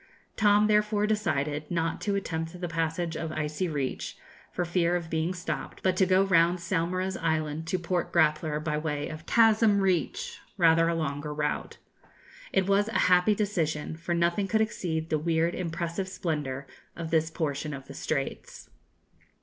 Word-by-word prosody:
Tom 210 -1 +4
therefore 210 0 +2
decided 150 -8 -1
not 165 -1 -1
to 200 -2 0
attempt 165 -3 -3
the 175 - -3
passage 165 0 -2
of 160 0 -3
Icy 155 +3 -2
Reach, 145 -5 -3 0.3
for 175 - -2
fear 175 0 +1
of 170 -2 -3
being 160 +2 0
stopped, 180 -1 -5
but 185 -1 +2
to 190 - +4
go 190 +1 +4
round 175 -2 +4
Saumarez 185 +2 -1
Island 160 -1 -1
to 185 - 0
Port 175 0 -2
Grappler 155 0 +2
by 155 -1 -1
way 150 -2 -2
of 155 +1 -9
Chasm 220 -2 +5
Reach, 185 -4 0 0.2
rather 165 -2 +5
a 170 - 0
longer 150 -2 -3
route. 150 0 -2 0.7
It 190 - +2
was 200 +1 +3
a 225 - -1
happy 180 +4 +5
decision; 165 -8 -1
for 170 +1 -2
nothing 170 +4 +1
could 220 +2 +2
exceed 165 -7 -2
the 155 - +2
weird 165 +2 +1
impressive 170 +1 -3
splendour 145 -7 -3 0.3
of 165 -1 -5
this 160 -1 +2
portion 150 -2 -2
of 135 -2 -7
the - - -10
Straits. - - -4
170 Hz, 165 wpm, -28 LUFS, 155-185 Hz, 0.7 s, Chasm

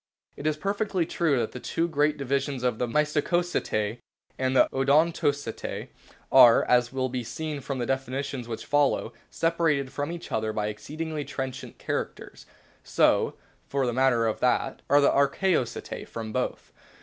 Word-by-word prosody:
It 145 - -4
is 155 -1 0
perfectly 200 0 -1
true 160 -4 +1
that 115 -2 -1
the 125 - -7
two 165 +6 -1
great 150 -2 +1
divisions 140 -1 -1
of 125 -3 0
the 125 - 0
M^stacoceti 150 - 0 0.4
and 130 0 -1
the - - +6
Odontoceti 145 -2 0 0.4
are, 120 -3 +8
as 125 -1 +3
wUl 130 -1 -1
be 125 -1 -3
seen 145 +5 -5
from 135 +1 -4
the 120 - -1
definitions 135 -1 -3
which 115 -2 -6
follow, 145 -5 +1 0.2
separated 160 -5 0
from 145 +2 -3
each 170 0 -8
other 110 0 0
by 105 -1 -1
exceedingly 155 +8 -5
trenchant 130 -2 -6
characters; - - -5 0.4
so, - - +2 0.3
for 140 -1 0
the 120 - -1
matter 125 -2 +3
of 110 - -1
that, 125 +2 +1
are 145 +1 +6
the 140 - +5
Archaeoceti 140 0 0
from 110 -1 -6
both. - - -3
135 Hz, 155 wpm, -27 LUFS, 125-150 Hz, 0.4 s, are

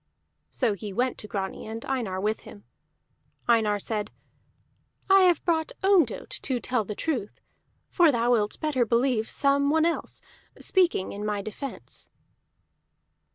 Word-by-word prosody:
So 240 -5 +1
he 205 +1 -6
went 250 +5 -1
to 210 - -8
Grani, 195 -1 -4
and 225 +1 -6
Einar 230 -9 -2
with 215 +3 0
him. 205 - -13 0.8
Einar 220 -3 +3
said: 210 +1 -3 1.0
"I 390 0 +8
have 355 -2 +3
brought 320 -2 0
Ondott 370 - +2
to 255 -3 0
tell 250 -2 0
the 210 +1 -6
truth, 245 -9 -3 0.5
for 340 -4 +4
thou 240 -1 +1
wilt 215 -3 +1
better 295 -6 +1
believe 235 0 +1
some 280 0 +2
one 315 +1 +3
else, 335 - -2 0.4
speaking 355 - +2
in 205 - -6
my 210 -1 -2
defence." 240 +6 -6
235 Hz, 140 wpm, -26 LUFS, 210-285 Hz, 1.0 s, I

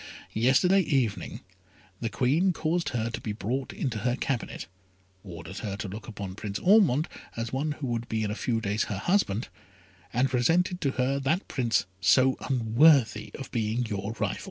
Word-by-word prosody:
Yesterday 135 - +4
evening 135 - -1 0.6
the 115 - -2
Queen 150 - +2
caused 165 +2 -1
her 115 -1 -2
to - - -5
be 105 - -3
brought 125 +5 -3
into 120 -6 -3
her 120 +3 0
cabinet, 130 -2 -3 0.6
ordered 95 0 -8
her 100 -3 -4
to 105 - -4
look 105 +4 -8
upon 100 -4 -6
Prince 100 0 -5
Ormond 180 - +4 0.3
as 115 0 -3
one 145 +3 -1
who 145 - -6
would 120 -1 -3
be 110 -1 -1
in 105 - -1
a - - -3
few 115 -1 -1
days 105 0 -1
her 100 - -4
husband, 115 - 0 0.6
and 125 +3 +2
presented 170 +9 +1
to 135 -2 0
her 130 +2 0
that 155 +8 0
Prince 115 -6 +1
so 130 +8 +4
unworthy 130 +2 +4
of 135 - -8
being 115 +1 0
your 105 0 -3
rival. - - -2
120 Hz, 175 wpm, -27 LUFS, 110-140 Hz, 0.6 s, Yesterday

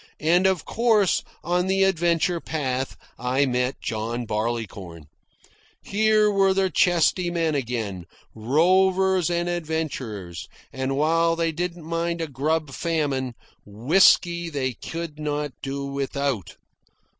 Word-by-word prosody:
And 175 +5 +3
of 190 -5 0
course, 220 -5 +2 0.2
on 180 +2 0
the 195 0 +2
adventure 175 -2 +1
path, 135 -5 -3 0.2
I 130 +3 +1
met 125 0 -1
John 115 +2 -3
Barleycorn. 105 -7 -4 0.8
Here 215 0 +3
were 195 -1 +3
the 190 -1 +1
chesty 175 0 +2
men 165 -2 0
again, 110 - -3 0.3
rovers 185 - +2
and 175 0 0
adventurers, 145 - -4 0.3
and 130 +1 -2
while 165 +2 +2
they 165 -1 0
didn't 170 0 -4
mind 170 +1 -2
a 165 - -2
grub 150 +2 -1
famine, 140 -6 -1 0.3
whisky 170 - +3
they 135 -4 -2
could 165 +4 -7
not 150 -1 -2
do 140 0 -4
without. 140 - -3
155 Hz, 120 wpm, -24 LUFS, 130-175 Hz, 0.8 s, And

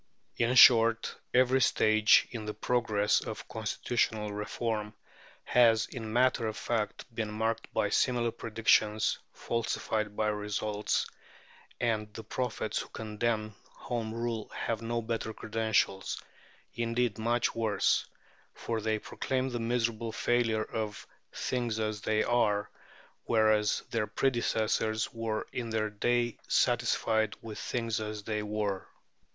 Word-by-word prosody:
In 120 +2 +2
short, 115 -2 +7 0.2
every 130 +1 +4
stage 110 -2 +5
in 115 -4 -5
the 105 - -4
progress 110 -2 +1
of 110 - -6
constitutional 110 -1 -1
reform 105 0 -3 0.5
has, 115 -3 +4
in 110 -4 -7
matter 125 0 +2
of 110 -1 -4
fact, 110 -2 -2
been 110 -1 -2
marked 110 +1 -2
by - - +1
similar 120 -2 +2
predictions 110 -1 +2
falsified 110 -2 -2
by 110 0 +1
results, 105 0 -1 0.7
and 110 -3 0
the 110 - -6
prophets 110 0 -2
who - - -6
condemn 110 0 -2 0.2
Home 115 -2 -4
Rule 115 -1 -3
have 115 -1 -3
no 115 0 -2
better 110 -1 -3
credentials; 110 -3 0 0.5
indeed, 120 0 -1
much 120 +2 +1
worse, 110 -2 +1 0.5
for 115 -1 -3
they 110 0 0
proclaim 130 +4 -2
the 120 -1 -3
miserable 115 -1 -1
failure 115 -1 +1
of 110 -2 -4 0.3
"things 120 -3 -2
as 110 -1 -2
they 110 0 +1
are," 105 -4 +1 0.5
whereas 110 -2 +3
their 115 -3 0
predecessors 110 -2 0
were 115 -2 -2
in 120 -2 -3
their 110 -1 -1
day 120 +2 0
satisfied 115 -3 +2
with 110 -2 -7
things 115 -2 -2
as 105 -1 -5
they 105 0 -2
were. 105 -2 -2
110 Hz, 125 wpm, -30 LUFS, 110-120 Hz, 0.7 s, short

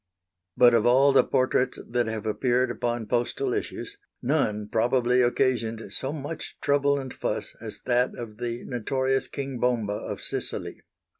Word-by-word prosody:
But 120 -1 +7
of 115 0 +4
all 135 +3 +6
the 135 - +6
portraits 130 -1 +1
that 120 -1 0
have 110 -1 -4
appeared 125 +3 +1
upon 120 -1 -2
postal 125 - 0
issues, 405 0 -4 0.2
none 115 -7 0
probably 120 +3 +2
occasioned 115 -4 0
so 135 - -2
much 150 +1 -6
trouble 140 0 +2
and 130 -2 -5
fuss - - -3
as - - -8
that 125 0 +1
of 110 -3 -8
the 120 0 -3
notorious 130 +2 0
King 135 -3 -5
Bomba 115 -4 +1
of - - -5
Sicily. - - -4
125 Hz, 150 wpm, -26 LUFS, 115-135 Hz, 0.2 s, But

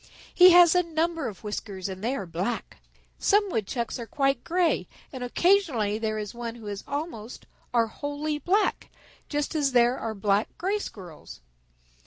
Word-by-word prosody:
He 360 0 +9
has 350 -2 +8
a 360 - +4
number 330 -3 -1
of 210 -2 -8
whiskers 205 -3 -5
and 190 0 -7
they 250 +4 0
are 200 - -4
black. 180 +8 -4 0.4
Some 410 -1 +3
Woodchucks 235 - -2
are 235 - -6
quite 275 -1 0
gray, 350 0 +1 0.3
and 255 -2 -5
occasionally 245 - +2
there 215 -1 -2
is 210 -1 -5
one 235 -1 -5
who 230 -2 -12
is 205 0 -5
almost, 285 -6 -5 0.3
or 235 -1 +3
wholly 290 +5 -4
black, 400 +7 +1 0.4
just 295 +1 -2
as 285 -4 +1
there 245 +1 +4
are 220 -1 -4
black 200 +1 0
Gray 390 +4 -1
Squirrels. 175 - -10
245 Hz, 165 wpm, -26 LUFS, 215-325 Hz, 0.4 s, He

